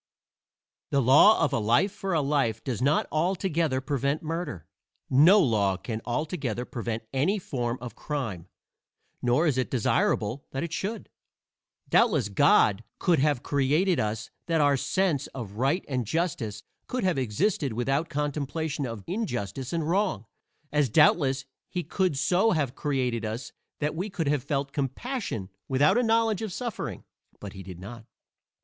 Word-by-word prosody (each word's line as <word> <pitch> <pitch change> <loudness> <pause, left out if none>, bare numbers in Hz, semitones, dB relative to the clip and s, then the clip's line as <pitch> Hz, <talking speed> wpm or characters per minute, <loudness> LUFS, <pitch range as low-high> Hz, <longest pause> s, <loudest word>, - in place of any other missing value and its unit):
II - - +2
The - - +4
law 145 - +7
of - - -2
a - - +2
life 120 - +3
for 195 -2 -3
a 155 - +3
life 135 -6 0
does 125 -4 -3
not 140 +4 +3
altogether 165 -4 0
prevent 140 +2 -1
murder. 160 - -4 0.5
No 160 +10 +7
law 105 - +2
can 110 +4 -5
altogether 125 - -2
prevent 115 -2 -4
any 150 +11 +2
form 125 -9 -3
of 125 0 -7
crime, 115 - -4 0.7
nor 125 +7 +2
is 140 -5 +2
it 130 - -1
desirable 120 0 +1
that 135 - -2
it 170 -1 -5
should. 210 +5 -3 0.8
Doubtless 100 - +3
God 100 +1 +4
could 175 -5 +2
so 140 - +3
have 145 -5 +1
created 150 +5 +2
us 110 0 -2 0.2
that 165 -1 +1
our 145 -1 +4
sense 145 +2 0
of 115 -7 -6
right 140 +9 +1
and 125 -5 -2
justice 135 - -2 0.2
could 255 -2 -2
have 180 -7 +1
existed 135 - 0
without 135 +7 0
contemplation 145 -1 -2
of 115 -4 -7
injustice 130 - -3
and 165 -3 -1
wrong; 185 - 0 0.5
as 150 -3 +2
doubtless 140 0 +4 0.2
he 180 - -3
could 185 -7 0
so 185 +9 +3
have 145 -6 0
created 130 -6 -1
us 110 +4 -4 0.3
that 150 0 -1
we 185 +6 -3
could 165 -5 -3
have 145 -4 +1
felt 140 -2 -2
compassion 140 - -3 0.2
without 140 +3 +3
a - - +3
knowledge 225 -3 +2
of 220 -3 -3
suffering; 240 +3 -5 0.4
but 100 -2 -8
he 95 - -9
did 90 -2 -9
not. 115 +4 -10
140 Hz, 160 wpm, -27 LUFS, 120-170 Hz, 0.8 s, law